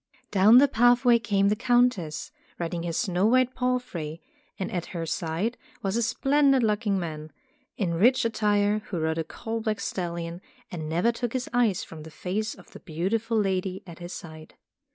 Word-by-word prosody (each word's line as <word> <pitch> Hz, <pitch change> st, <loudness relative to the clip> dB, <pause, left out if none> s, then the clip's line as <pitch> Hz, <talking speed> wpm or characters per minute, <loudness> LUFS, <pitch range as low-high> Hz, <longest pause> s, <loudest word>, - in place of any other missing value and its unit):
Down 205 Hz, +4 st, +7 dB
the 280 Hz, +3 st, +7 dB
pathway 245 Hz, -1 st, +4 dB
came 200 Hz, -2 st, +2 dB
the 210 Hz, -, +2 dB
Countess, 225 Hz, -10 st, +1 dB, 0.3 s
riding 170 Hz, 0 st, -3 dB
her 170 Hz, 0 st, -3 dB
snow 185 Hz, +3 st, +1 dB
white 255 Hz, +2 st, +3 dB
palfrey; 250 Hz, -12 st, -2 dB, 0.4 s
and 190 Hz, -, -4 dB
at 175 Hz, -2 st, -3 dB
her 165 Hz, -, -2 dB
side 170 Hz, +9 st, -2 dB, 0.2 s
was 195 Hz, +1 st, -1 dB
a 235 Hz, -, +1 dB
splendid 270 Hz, +3 st, +3 dB
looking 210 Hz, -2 st, +1 dB
man, 155 Hz, -3 st, -5 dB, 0.5 s
in 180 Hz, -5 st, 0 dB
rich 235 Hz, +9 st, +4 dB
attire, 210 Hz, -2 st, +2 dB
who 180 Hz, -, -3 dB
rode 160 Hz, +1 st, -1 dB
a -, -, 0 dB
coal 225 Hz, +6 st, -5 dB
black 215 Hz, -1 st, -1 dB
stallion, 170 Hz, -1 st, -4 dB, 0.3 s
and 155 Hz, -3 st, -5 dB
never 175 Hz, +9 st, +2 dB
took 235 Hz, 0 st, -4 dB
his 255 Hz, -1 st, -2 dB
eyes 235 Hz, -6 st, +2 dB
from 160 Hz, -1 st, -10 dB
the 160 Hz, -, -10 dB
face 205 Hz, +7 st, -3 dB
of 180 Hz, -, -17 dB
the -, -, -11 dB
beautiful 205 Hz, +8 st, -1 dB
lady 190 Hz, -2 st, -1 dB
at 170 Hz, -2 st, -11 dB
his 175 Hz, 0 st, -7 dB
side. 155 Hz, -3 st, -10 dB
200 Hz, 175 wpm, -26 LUFS, 170-235 Hz, 0.5 s, Down